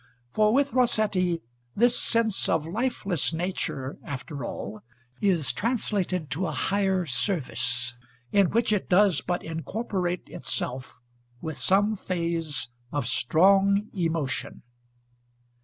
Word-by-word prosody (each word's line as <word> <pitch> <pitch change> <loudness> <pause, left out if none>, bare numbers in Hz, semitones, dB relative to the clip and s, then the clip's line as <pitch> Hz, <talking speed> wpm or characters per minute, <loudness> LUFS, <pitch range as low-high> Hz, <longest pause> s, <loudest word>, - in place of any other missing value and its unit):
For 215 +5 +3
with 280 +3 +2
Rossetti 210 -8 +2 0.3
this 240 +3 +4
sense 225 -3 +1
of 160 -2 +1
lifeless 200 - 0
nature, 160 -6 -3
after 140 0 -6
all, 105 -1 -6 0.4
is 165 - +2
translated 190 - -1
to 180 +4 -1
a - - -2
higher 190 +2 +1
service, 125 - 0 0.4
in 200 -4 +4
which 230 -1 +2
it 205 - -1
does 190 -3 +4
but 175 -1 -2
incorporate 180 +2 -3
itself 130 +1 -4 0.4
with 160 +1 -5
some 205 +3 +3
phase 170 - -2 0.2
of 145 -4 -1
strong 195 - +3
emotion. 165 -7 -2
180 Hz, 110 wpm, -27 LUFS, 155-205 Hz, 0.4 s, this